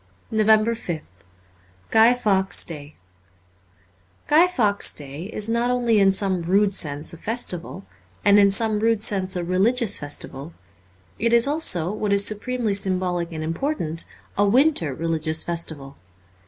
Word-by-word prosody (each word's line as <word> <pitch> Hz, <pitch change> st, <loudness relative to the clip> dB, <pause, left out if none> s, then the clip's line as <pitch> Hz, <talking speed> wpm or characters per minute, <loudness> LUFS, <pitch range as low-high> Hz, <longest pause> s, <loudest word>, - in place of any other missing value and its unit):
344 220 Hz, -1 st, +1 dB
NOVEMBER 215 Hz, -6 st, +1 dB
5th 90 Hz, -, -29 dB, 0.7 s
GUY 225 Hz, +2 st, +6 dB
FAWKES' 195 Hz, -5 st, 0 dB
DAY 150 Hz, -2 st, -10 dB, 1.3 s
GUY 320 Hz, +4 st, +4 dB
FAWKES' 210 Hz, -, +1 dB
Day 145 Hz, +2 st, -8 dB
is 210 Hz, 0 st, 0 dB
not 235 Hz, +2 st, 0 dB
only 240 Hz, -3 st, +1 dB
in 195 Hz, -1 st, +4 dB
some 190 Hz, -2 st, +1 dB
rude 195 Hz, +4 st, +1 dB
sense 150 Hz, -3 st, -2 dB
a -, -, -9 dB
festival, 195 Hz, -4 st, -2 dB, 0.4 s
and 205 Hz, 0 st, +6 dB
in 200 Hz, -1 st, +5 dB
some 215 Hz, +1 st, 0 dB
rude 225 Hz, -1 st, +1 dB
sense 190 Hz, -2 st, 0 dB
a 175 Hz, -, -3 dB
religious 210 Hz, +6 st, +1 dB
festival; 145 Hz, +1 st, -5 dB, 0.7 s
it 230 Hz, +2 st, 0 dB
is 235 Hz, +1 st, +5 dB
also, 240 Hz, -, +1 dB
what 210 Hz, -1 st, -3 dB
is 200 Hz, 0 st, +4 dB
su -, -, +2 dB
premely 230 Hz, -1 st, -3 dB
symbolic 180 Hz, -3 st, -1 dB
and 155 Hz, -1 st, -6 dB
important, 165 Hz, -, -3 dB, 0.3 s
a 205 Hz, -, +2 dB
winter 235 Hz, -, +2 dB
religious 160 Hz, 0 st, -1 dB
festival. 160 Hz, -5 st, -3 dB
200 Hz, 145 wpm, -22 LUFS, 170-225 Hz, 1.3 s, GUY